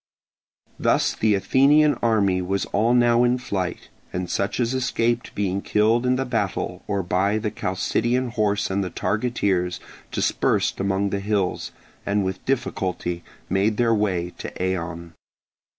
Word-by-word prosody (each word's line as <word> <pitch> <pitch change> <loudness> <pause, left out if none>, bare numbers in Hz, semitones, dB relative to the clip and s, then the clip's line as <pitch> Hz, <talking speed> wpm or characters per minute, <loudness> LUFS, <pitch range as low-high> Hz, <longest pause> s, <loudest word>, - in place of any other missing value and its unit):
Thus - - +2
the 105 -2 +2
Athenian 145 +8 +4
army 100 -5 +2
was 95 +2 -1
all 115 +4 +3
now 120 0 +4
in 125 +1 +3
flight; 95 -7 -4 0.2
and 90 -1 -3
such 100 +4 -1
as 120 0 +1
escaped 120 -2 -1
being 100 -1 -1
killed 115 +5 +2
in 125 - +3
the 135 +1 -1
battle, 110 -6 -2
or 100 -1 -1
by 95 +4 +1
the 110 -1 -2
Chalcidian 120 +6 0
horse 105 -4 0
and 100 +1 0
the 90 - -3
targeteers, 100 -4 -1 0.3
dispersed - - +1
among 100 0 0
the 100 - -1
hills, 100 -2 -1 0.3
and 100 -1 0
with 95 0 -4
difficulty 95 -9 -2 0.2
made 100 +3 +1
their 115 -1 +3
way 95 -5 0
to - - -5
Eion. 85 -2 -3
100 Hz, 145 wpm, -23 LUFS, 95-120 Hz, 0.3 s, Athenian